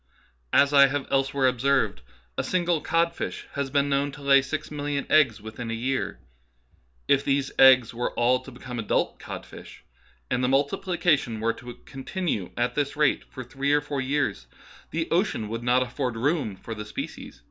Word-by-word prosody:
As 140 +1 +4
I 140 -1 +8
have 140 0 -2
elsewhere 135 0 +1
observed, 130 - +1 0.2
" - - -36
a - - -1
single 175 -3 0
codfish 170 +1 -1
has 140 -2 -2
been 140 +1 +2
known 140 0 0
to 145 -1 -11
lay 140 0 +6
six 145 +4 -5
million 145 -1 -2
eggs 135 -8 +4
within 110 +2 -7
a 115 - -2
year. 130 +3 -2 0.9
If 140 0 +3
these 135 -1 0
eggs 130 -3 +7
were 120 +1 -2
all 125 +2 +3
to 130 - -12
become 125 -1 -7
adult 110 - 0
cod - - -7
fishes, - - -13 0.5
and 125 - +1
the - - +3
multiplication 140 - +1
were 115 +1 +1
to 120 +1 -10
continue 135 - -3
at 120 +1 0
this 145 -1 -1
rate 150 -2 +2
for 130 - -9
three 135 +4 -1
or 145 - +5
four 145 -2 -3
years, 130 - -1 0.4
the 165 +1 -2
ocean 170 - +1
would 115 +1 -4
not 125 +1 +3
afford 125 -1 -3
room 140 - 0
for 115 +4 -7
the 105 -1 -6
species. 105 - -7
135 Hz, 180 wpm, -26 LUFS, 120-145 Hz, 0.9 s, I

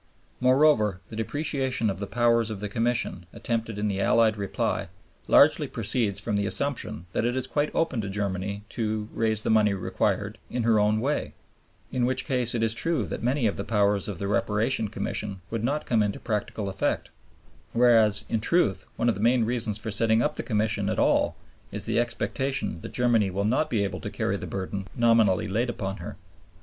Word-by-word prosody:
Moreover, 130 -7 +4
the 110 - -8
depreciation 130 0 -1
of 95 -2 -2
the 100 - -4
powers 115 -1 +2
of 105 -3 -5
the 105 - -3
Commission 115 -4 -1
attempted 115 -2 -3
in 105 +1 -1
the 100 -1 -1
Allied 110 +1 +4
reply 100 -2 -2 0.4
largely - - +5
proceeds 100 -5 -1
from 105 +1 -2
the 100 -1 0
assumption 125 - -1
that - - 0
it 120 +1 0
is 130 - -1
quite 145 0 0
open 160 -8 +1
to 100 - -5
Germany 100 0 -3
to 110 -2 -2
"raise 110 -1 0
the - - +1
money 105 -2 +4
required 95 - -1
in 125 - -2
her 110 -2 +4
own 105 +1 +2
way," 145 +4 -1 0.6
in 125 - 0
which 130 0 0
case 125 -4 0
it 115 - 0
is 110 -1 +2
true 155 -2 -1
that - - -5
many 125 +2 +1
of 105 - 0
the - - -3
powers 100 -3 +1
of 100 -4 -4
the 100 - -3
Reparation 110 +2 +1
Commission 100 -1 -4
would 115 -1 -2
not 145 +5 -1
come 115 -3 +2
into 105 -1 -1
practical 105 -1 -3
effect; 95 0 -2 0.6
whereas 110 -4 +4
in 115 - 0
truth 105 - +1
one 115 - 0
of 120 - +4
the 100 - -6
main 120 +1 +3
reasons 115 -3 -1
for 110 +1 -4
setting 110 +2 +2
up - - 0
the - - -2
Commission 105 -2 0
at - - -1
all - - +2 0.4
is - - -4
the - - +1
expectation 120 -4 -1
that - - -8
Germany 120 -5 +2
will 100 +2 -2
not 130 +8 +1
be 110 -7 +1
able 100 - -3
to - - -5
carry - - -1
the - - -7
burden 95 0 -4
nominally 115 -4 +3
laid 115 +5 0
upon 95 -4 -4
her. - - -7
110 Hz, 200 wpm, -26 LUFS, 100-120 Hz, 0.6 s, largely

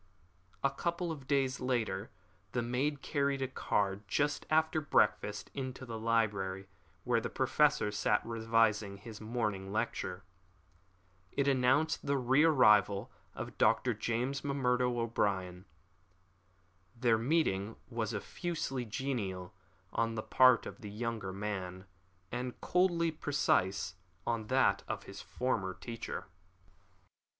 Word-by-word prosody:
A 140 - +3
couple 170 +4 -2
of 140 -5 -8
days 135 -2 +1
later 115 -5 -1 0.4
the 125 - 0
maid 135 +4 -1
carried 140 -2 0
a - - 0
card 100 -6 0
just 145 +7 0
after 160 0 +3
breakfast 105 -7 +1
into 130 -1 -5
the 115 -2 -5
library 105 -4 0 0.4
where 120 -2 +2
the - - -3
Professor 145 -2 +2
sat 105 0 +1
revising 115 -3 +1
his 110 +1 -10
morning 105 -4 -2
lecture. 100 -4 -2 1.1
It 140 0 0
announced 135 +4 +3
the 140 0 +1
re 135 +3 +4
arrival 105 -10 +5 0.2
of - - -7
Dr. 125 - +3
James 120 +5 -2
M'Murdo 125 -3 +1
O'Brien. 95 -5 -1 1.3
Their 115 -2 +3
meeting 115 - +1
was 115 -3 -2
effusively 135 - -3
genial 105 -7 -3 0.4
on 115 0 0
the 110 - -3
part 130 -2 +5
of - - -8
the 105 - -7
younger 110 -2 -3
man, 95 -2 -4 0.5
and 125 +1 -4
coldly 175 -2 +2
precise 120 - +1 0.3
on 115 -2 -1
that - - +3
of - - -4
his - - -9
former 105 -7 -2
teacher. 115 -6 -6
115 Hz, 120 wpm, -33 LUFS, 105-135 Hz, 1.3 s, arrival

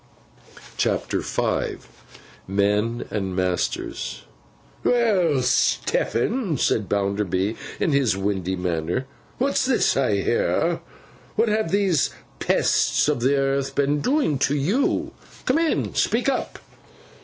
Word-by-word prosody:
CHAPTER - - 0
V - - -1 0.7
MEN 105 +4 0
AND 95 -3 -2
MASTERS 90 -1 -2 0.6
'WELL, 190 - +2
Stephen,' 175 - +1
said 105 -4 +1
Bounderby, 100 0 0 0.2
in 165 - +1
his 135 -8 +2
windy 95 -2 -1
manner, 90 +6 -2 0.3
'what's 275 +2 +1
this 265 0 +2
I - - +2
hear? - - +1 0.6
What 230 - +2
have 215 -4 0
these 190 -6 +2 0.3
pests - - +2
of 150 -4 +1
the 130 +4 +2
earth 135 0 0
been 145 +1 +2
doing 255 - +1
to 140 +1 +2
you? 190 - 0 0.3
Come 260 +5 +2
in, 330 -1 +2
and - - -2
speak - - +1
up. - - -2
135 Hz, 115 wpm, -23 LUFS, -, 0.7 s, WELL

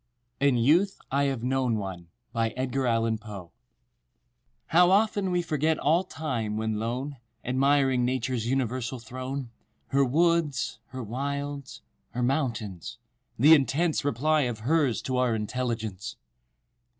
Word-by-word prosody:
} 120 0 -48
"IN 130 -3 +3
YOUTH 165 - +3
I 140 +1 +2
HAVE 135 -4 -2
KNOWN 130 -2 +1
ONE" 95 -4 -6 0.3
_How 115 -5 -1 1.2
often 190 +3 +4
we 180 -1 +1
forget 155 0 +1
all 165 +5 +2
time, 120 - -3
when 110 -1 -1
lone 130 +5 -3 0.3
Admiring 135 0 +3
Nature's 125 -2 -1
universal 130 -1 -1
throne; 130 +2 -6 0.4
Her 140 0 +3
woods—her 135 -5 0
wilds—her 135 - -5
mountains—the 120 - 0
intense 150 +4 +2
Reply 150 +3 +2
of 110 -2 -6
Hers 140 -1 +1
to 130 -1 -1
Our 125 -2 +2
intelligence! 110 -3 -3
130 Hz, 105 wpm, -27 LUFS, 115-145 Hz, 1.2 s, often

